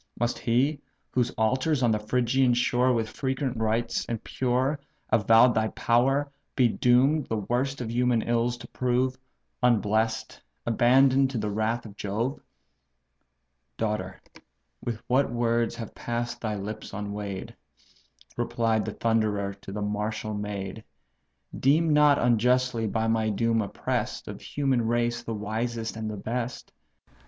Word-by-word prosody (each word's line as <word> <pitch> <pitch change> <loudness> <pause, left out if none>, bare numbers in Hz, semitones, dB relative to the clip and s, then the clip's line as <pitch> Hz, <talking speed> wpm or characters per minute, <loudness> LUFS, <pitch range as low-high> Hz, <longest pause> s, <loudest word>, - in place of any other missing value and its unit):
Must 120 +1 0
he, 135 +5 +1 0.3
whose 125 -1 +1
altars 130 +5 +1
on 120 - +4
the 105 - +1
Phrygian 125 +3 +2
shore 125 +1 +2
With 115 -2 0
frequent 130 +1 -2
rites, 115 +1 0
and 115 -2 -3
pure, 130 +3 0 0.3
avow'd 115 +3 +6
thy 110 0 +1
power, 135 +6 +1 0.2
Be 125 -3 +5
doom'd 130 +6 +3
the 110 - -1
worst 125 +6 -1
of 115 -2 -4
human 120 -1 +2
ills 120 +1 0
to 120 - -11
prove, 130 +1 0 0.5
Unbless'd, 110 -2 +1 0.2
abandon'd 130 +3 +4
to 130 - -4
the 105 -1 -2
wrath 110 +3 -1
of 100 -2 -10
Jove?" 110 +7 -2 1.4
"Daughter! 105 -4 -2 0.9
what 130 +2 +2
words 120 -1 +1
have 115 -3 -7
pass'd 120 0 -4
thy 110 -2 -2
lips 105 +2 -6
unweigh'd! 100 -1 -5 0.8
(Replied 115 -2 0
the 110 - -4
Thunderer 105 -3 0
to 100 0 -11
the 105 +1 -3
martial 105 +1 -2
maid;) 105 0 -5 0.8
Deem 155 +4 +3
not 150 -1 +6
unjustly 125 0 +2
by 110 +2 -1
my 110 -1 +1
doom 115 +2 +1
oppress'd, 100 - -3
Of - - -7
human 130 -5 0
race 120 0 0
the 115 -2 -4
wisest 110 +2 -3
and 110 -1 -4
the 105 - -5
best. 120 +4 -4
115 Hz, 135 wpm, -27 LUFS, 110-125 Hz, 1.4 s, avow'd